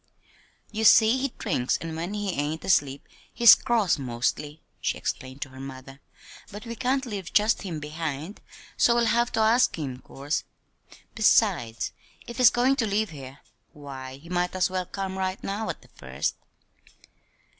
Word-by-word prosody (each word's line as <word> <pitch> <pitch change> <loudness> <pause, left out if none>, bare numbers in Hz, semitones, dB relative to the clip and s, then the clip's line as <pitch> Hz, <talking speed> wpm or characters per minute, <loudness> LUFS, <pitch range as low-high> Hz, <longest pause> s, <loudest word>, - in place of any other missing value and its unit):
"You 220 0 -3
see 225 +3 +6
he 275 0 -1
drinks, 135 - 0
and 165 -1 -6
when 175 +5 -4
he 205 -2 -2
ain't 150 0 -3
asleep 140 -6 +1 0.2
he's 235 -2 +9
cross, 225 - +1
mostly," 135 +4 -3 0.2
she - - -1
explained 130 +1 -4
to 140 - -12
her 130 0 -13
mother; 135 0 -10 0.5
"but 205 +2 -9
we 230 - -5
can't 265 +2 0
leave 200 -7 -6
just 215 +1 +3
him 175 -6 -5
behind, 155 +3 -5 0.4
so 235 - +4
we'll 240 0 +3
have 235 +2 +2
to 220 - +1
ask 230 +3 +4
him, 135 -5 -5
'course. 140 +3 -4 0.7
Besides, 190 - +2 0.3
if 235 - -9
he's 250 -3 +8
goin' 250 +3 +2
to 230 -5 +1
live 210 -1 0
here, 135 -2 -10 0.3
why, 135 -2 -9
he 150 +5 -16
might 180 +1 -1
as 185 0 +1
well 185 -1 -2
come 190 0 -4
right 190 0 -2
now 205 +3 -3
at - - -6
the - - -21
first." - - -3
185 Hz, 165 wpm, -26 LUFS, 140-220 Hz, 0.7 s, he's